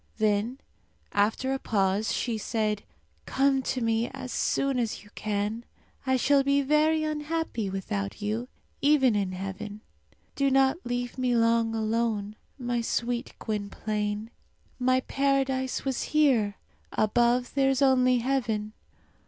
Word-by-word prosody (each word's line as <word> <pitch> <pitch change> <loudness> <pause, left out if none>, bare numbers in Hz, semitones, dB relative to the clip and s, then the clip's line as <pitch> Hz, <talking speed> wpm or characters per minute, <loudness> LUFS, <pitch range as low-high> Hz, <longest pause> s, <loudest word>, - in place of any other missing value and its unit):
Then, 215 +3 +1 0.5
after 220 +6 +1
a 270 - -2
pause, 200 -1 +1
she 235 -2 -1
said, 215 -1 -1 0.5
"Come 270 0 +2
to 255 0 -2
me 225 0 +1
as 265 -1 -7
soon 275 -2 0
as 230 -4 -2
you 205 - -18
can. 210 +2 -2 0.4
I 260 0 +3
shall 280 +2 +4
be 280 +1 +2
very 305 +2 +3
unhappy 305 -7 -2
without 100 - -3
you, 215 +4 -2 0.3
even 275 -5 +4
in 195 -2 0
heaven. 195 +3 -6 0.5
Do 275 -1 +2
not 270 +2 +4
leave 245 +1 -3
me 250 -1 +2
long 230 0 +2
alone, 220 -2 -1 0.2
my 245 -2 -1
sweet 240 +1 -2
Gwynplaine! 210 0 -3 0.5
My 255 +1 +3
paradise 270 -1 0
was 265 -2 -1
here; 255 -10 +2 0.4
above 240 +3 +2
there 270 -1 +3
is 270 +1 +2
only 255 -2 +4
heaven! 230 -4 -1
240 Hz, 130 wpm, -27 LUFS, 215-270 Hz, 0.5 s, shall